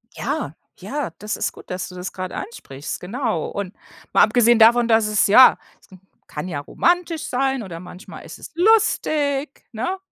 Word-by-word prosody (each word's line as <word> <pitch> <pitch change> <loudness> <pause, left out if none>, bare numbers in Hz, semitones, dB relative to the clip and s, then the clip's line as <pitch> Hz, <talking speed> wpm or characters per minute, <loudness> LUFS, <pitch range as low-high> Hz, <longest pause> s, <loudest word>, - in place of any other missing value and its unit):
Ja, - - -3 0.2
ja, 290 -4 -4
das 210 0 -4
ist - - -1
gut, - - -15
dass 180 0 -4
du 180 - -12
das 180 +1 -6
grade 185 -1 -6
ansprichst, 145 - -7
genau, 220 - -3
und 200 0 -5 0.4
mal - - +5
abgesehen 240 -1 +4
davon, 235 +1 +6
dass 225 -2 +3
es 210 -1 +2
ja, 250 +6 +7 0.2
es - - -25 0.4
kann 150 +4 -6
ja 160 -6 -4
romantisch 340 - 0
sein 265 -1 -1
oder 170 -4 -8
manchmal 180 +3 -11
ist - - -10
es - - -11
lustig, 305 -8 +1
ne, 250 - -3
230 Hz, 170 wpm, -21 LUFS, 185-280 Hz, 0.4 s, ja